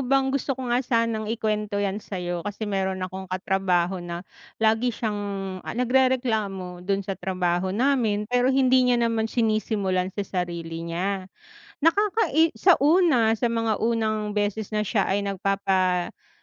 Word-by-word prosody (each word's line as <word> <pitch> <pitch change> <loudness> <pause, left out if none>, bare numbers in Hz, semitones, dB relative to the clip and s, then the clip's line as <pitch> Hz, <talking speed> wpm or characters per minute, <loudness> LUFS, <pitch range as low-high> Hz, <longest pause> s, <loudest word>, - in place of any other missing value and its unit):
bang 270 0 +2
gusto 275 -1 -1
ko 255 -2 -3
nga 245 - +3
sanang 230 -3 0
ikuwento 215 -2 -1
'yan 200 0 -1
sa'yo, 175 -4 -4
kasi 205 +4 -5
meron 190 -2 -1
akong 190 0 -7
katrabaho 185 -1 0
na 175 +1 -6 0.3
lagi 225 +2 +2
siyang, 215 -3 -2 0.4
ah, - - -7
nagrereklamo 235 -8 0
'don 195 +2 -1
sa 195 - -3
trabaho 180 -1 -1
namin, 220 -1 +1
pero 245 +3 +1
hindi 260 -1 +4
niya 245 - +4
naman 230 -2 0
sinisimulan 215 -5 0
sa 205 - -1 0.2
sarili 170 -2 -5
niya. 185 +3 -3 0.6
Nakakai 330 -3 +3
sa 365 -2 +4
una, 285 -8 +4
sa 235 +1 0
mga 225 -2 0
unang 215 -2 0
beses 210 +1 -2
na 215 - 0
siya 210 -1 +1
ay 195 - 0
nagpapaabot 190 -2 -1
210 Hz, 145 wpm, -25 LUFS, 190-240 Hz, 0.6 s, hindi